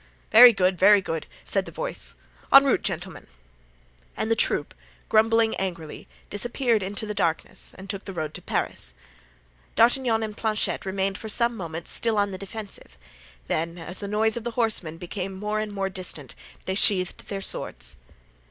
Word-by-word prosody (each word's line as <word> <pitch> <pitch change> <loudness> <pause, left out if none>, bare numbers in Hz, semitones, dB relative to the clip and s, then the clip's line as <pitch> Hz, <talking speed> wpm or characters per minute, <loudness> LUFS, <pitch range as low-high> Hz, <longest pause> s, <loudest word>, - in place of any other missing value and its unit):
"Very 245 +2 +10
good, 185 -4 +1
very 205 +2 +7
good," 165 -4 -4 0.2
said - - 0
the - - -9
voice. - - -4 0.4
"En 275 0 +10
route, 275 - +2
gentlemen." 185 -2 -4 0.9
And 220 - -1
the - - +4
troop, - - 0 0.4
grumbling 225 0 +4
angrily, 170 -5 -5 0.2
disappeared 235 +1 0
in 195 +2 -4
the 210 +1 -2
darkness 170 -5 -1
and 190 +1 -10
took 195 -1 -5
the 195 - -6
road 155 -3 -4
to - - -8
Paris. 60 0 -2 0.8
D'Artagnan 235 -1 +3
and 215 -1 -5
Planchet 215 -3 -1
remained 195 0 -1
for 220 - -7
some 235 +2 +3
moments 165 -4 -5
still 225 -2 +1
on 205 -1 +1
the 185 - -6
defensive; 200 - -9 0.5
then, 165 - -2
as 175 +2 -7
the 200 - -5
noise 215 +2 +1
of 235 - -4
the 240 - -2
horsemen 210 -9 0
became 180 +2 -5
more 210 +2 -2
and 215 -1 -3
more 195 -1 -2
distant, 180 -7 -3 0.3
they 190 - -1
sheathed 190 -2 +2
their 200 - -3
swords. - - -2
200 Hz, 170 wpm, -25 LUFS, 180-220 Hz, 0.9 s, Very